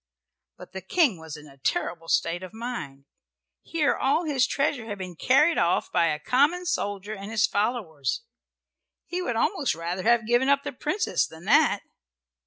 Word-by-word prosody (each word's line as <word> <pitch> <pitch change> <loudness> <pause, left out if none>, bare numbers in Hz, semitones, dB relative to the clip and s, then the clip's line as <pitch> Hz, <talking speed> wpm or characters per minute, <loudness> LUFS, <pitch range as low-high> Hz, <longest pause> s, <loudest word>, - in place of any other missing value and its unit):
But - - -12
the 190 - -6
King 230 - +2
was 160 -2 -8
in 150 0 -13
a 140 -1 -17
terrible 165 +5 -2
state 170 +1 +1
of 185 +3 -9
mind. 155 - -6 0.6
Here 315 -4 +1
all 290 +6 +1
his 275 -5 +2
treasure 275 -4 -1
had 205 -2 -5
been 185 -2 -7
carried 285 - +3
off 170 +1 +1
by 170 - +3
a 150 - 0
common 290 - +2
soldier 205 - -2
and 200 0 -7
his 225 0 +3
followers. 205 - -1 0.8
He 360 +1 -3
would 240 -9 -2
almost 280 - +1
rather 170 +3 -4
have 235 +2 +3
given 240 +4 +2
up 280 0 +3
the - - -4
Princess 315 +10 0
than 160 +2 -13
that. 280 -3 +4
220 Hz, 175 wpm, -26 LUFS, 170-275 Hz, 0.8 s, that